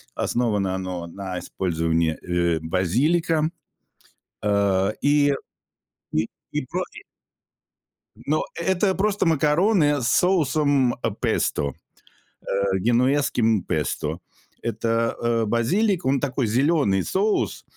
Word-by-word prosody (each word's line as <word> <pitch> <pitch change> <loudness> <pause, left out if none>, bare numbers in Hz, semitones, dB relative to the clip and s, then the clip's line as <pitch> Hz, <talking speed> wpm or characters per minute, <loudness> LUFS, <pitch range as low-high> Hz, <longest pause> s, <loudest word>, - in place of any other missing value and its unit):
основано 105 -6 0
оно 90 -2 -4
на 95 0 -6
использовании, 80 -3 -1
э, 85 -2 0
базилика. 145 - +1 0.9
Э, 100 -1 +1
и 145 0 +3 0.8
и - - +1 0.2
и 150 -3 -2
про 180 +2 -2 1.3
Но - - -1
это 190 +1 +1
просто 205 0 0
макароны 155 - +3
с 120 - 0
соусом 145 -5 +2 0.3
песто, 70 -1 0 0.7
э, - - -26 0.3
генуэзским 120 -2 +2
песто. 80 +3 -2 0.4
Это, 115 0 -1
э, 115 -1 +1
базилик, 180 - +1
он 135 +1 +2
такой 130 -2 -1
зеленый 125 - +2
соус, 205 +3 0
120 Hz, 95 wpm, -23 LUFS, 95-155 Hz, 1.3 s, и